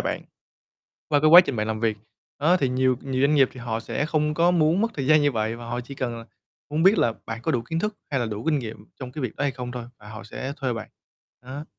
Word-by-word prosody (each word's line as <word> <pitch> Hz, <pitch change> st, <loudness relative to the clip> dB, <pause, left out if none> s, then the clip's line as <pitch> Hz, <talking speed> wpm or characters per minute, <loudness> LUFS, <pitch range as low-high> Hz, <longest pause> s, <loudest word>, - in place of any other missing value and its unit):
bạn -, -, -2 dB, 0.9 s
qua 145 Hz, -, +3 dB
cái 155 Hz, -, +4 dB
quá 175 Hz, +2 st, +12 dB
trình 140 Hz, -9 st, -3 dB
bạn 105 Hz, -, -1 dB
làm 110 Hz, 0 st, -3 dB
việc. 110 Hz, -2 st, +1 dB, 0.4 s
Đó, 170 Hz, +5 st, +4 dB
thì 135 Hz, -6 st, 0 dB
nhiều 130 Hz, 0 st, +2 dB
nhiều 130 Hz, -1 st, -2 dB
doanh 145 Hz, +2 st, +4 dB
nghiệp 135 Hz, -3 st, +5 dB
thì 130 Hz, -, -10 dB
họ 115 Hz, -2 st, -3 dB
sẽ 145 Hz, +6 st, -2 dB
không 150 Hz, -1 st, 0 dB
có 170 Hz, +2 st, +4 dB
muốn 170 Hz, +1 st, +3 dB
mất 230 Hz, +1 st, +1 dB
thời 135 Hz, -3 st, -3 dB
gian 155 Hz, 0 st, +5 dB
như 145 Hz, -2 st, +2 dB
vậy, 110 Hz, 0 st, -1 dB
và 120 Hz, -, -9 dB
họ 120 Hz, +1 st, -3 dB
chỉ 125 Hz, +3 st, -10 dB
cần 125 Hz, -3 st, -3 dB
là 115 Hz, -, -10 dB, 0.5 s
muốn 155 Hz, +2 st, 0 dB
biết 195 Hz, +4 st, +5 dB
là 115 Hz, -, +3 dB
bạn 115 Hz, +1 st, -5 dB
có -, -, 0 dB
đủ 120 Hz, -2 st, 0 dB
kiến 160 Hz, +7 st, -3 dB
thức 210 Hz, +3 st, -2 dB
hay 135 Hz, -3 st, 0 dB
là 120 Hz, -, -1 dB
đủ 110 Hz, +1 st, -5 dB
kinh 155 Hz, -2 st, +2 dB
nghiệm 110 Hz, -4 st, -7 dB, 0.2 s
trong 125 Hz, -1 st, -7 dB
cái 150 Hz, -, -5 dB
việc 125 Hz, -, -4 dB
đó -, -, -3 dB
hay 145 Hz, -, +2 dB
không 125 Hz, -1 st, -6 dB
thôi, 120 Hz, -1 st, -5 dB
và 105 Hz, -, -14 dB
họ 110 Hz, -2 st, -9 dB
sẽ 130 Hz, +5 st, -5 dB
thuê 130 Hz, -3 st, -2 dB
bạn, 115 Hz, -2 st, -6 dB, 0.6 s
đó. 140 Hz, +4 st, -6 dB
130 Hz, 285 wpm, -24 LUFS, 115-150 Hz, 0.9 s, quá